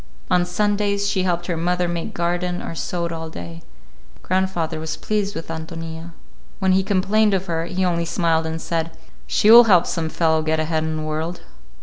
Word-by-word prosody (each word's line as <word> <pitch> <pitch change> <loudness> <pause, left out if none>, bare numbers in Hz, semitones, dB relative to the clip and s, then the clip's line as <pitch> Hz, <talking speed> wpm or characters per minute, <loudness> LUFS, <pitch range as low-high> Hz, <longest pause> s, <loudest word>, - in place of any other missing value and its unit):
On 180 -1 +3
Sundays 200 +1 0
she 200 -2 0
helped 175 -2 0
her 175 - -2
mother 175 +2 0
make 170 -1 -4
garden 175 +1 -1
or - - -5
sewed 170 0 -3
all 160 -1 -5
day. 85 - -8 0.6
Grandfather 185 -4 -1
was 160 0 -4
pleased 210 -1 -2
with 165 - -6
Ántonia. 165 +1 -6 0.4
When 190 -2 +2
we 190 - +4
complained 205 +2 +2
of 190 0 -2
her, 165 -2 -2
he 185 +2 -1
only 170 -1 0
smiled 165 -1 +1
and 160 0 -4
said, 165 0 -3 0.3
"She 215 - +4
will 240 +1 +10
help 180 -5 +5
some 165 -2 -2
fellow 160 -1 +1
get 155 0 0
ahead 155 0 0
in 160 0 -2
the 155 - -3
world." 155 +3 -3
170 Hz, 190 wpm, -21 LUFS, 160-190 Hz, 0.6 s, will